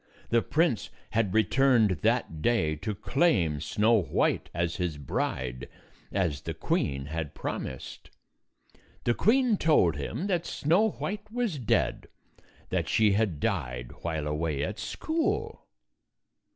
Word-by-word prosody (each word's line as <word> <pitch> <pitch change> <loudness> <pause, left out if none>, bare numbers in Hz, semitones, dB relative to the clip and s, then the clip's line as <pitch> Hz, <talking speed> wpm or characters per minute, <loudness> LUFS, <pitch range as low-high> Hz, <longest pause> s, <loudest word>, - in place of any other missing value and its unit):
The 115 0 +4
prince 155 -5 +1 0.2
had 110 -4 +1
returned 115 0 +4
that 110 -9 0
day 80 -10 +2
to 105 +6 -4
claim 95 - +1
Snow 110 +6 +3
White - - 0
as 85 0 -1
his 90 -5 -2
bride, 65 -2 -3 0.4
as 85 -8 0
the - - -5
queen 70 -1 -1
had 80 0 -4
promised. 65 -2 -6 0.9
The 120 - +2
queen 235 - +3
told 95 - +3
him 75 - -3
that 175 -4 0
Snow 175 +9 +2
White 210 +1 -5
was 230 - -1
dead; 115 - 0 0.6
that - - -1
she 110 -2 +4
had 100 -6 +1
died 60 - -2
while 80 -3 -2
away 75 -1 -1
at 105 +7 -4
school. 330 +6 -2
105 Hz, 125 wpm, -28 LUFS, -, 0.9 s, The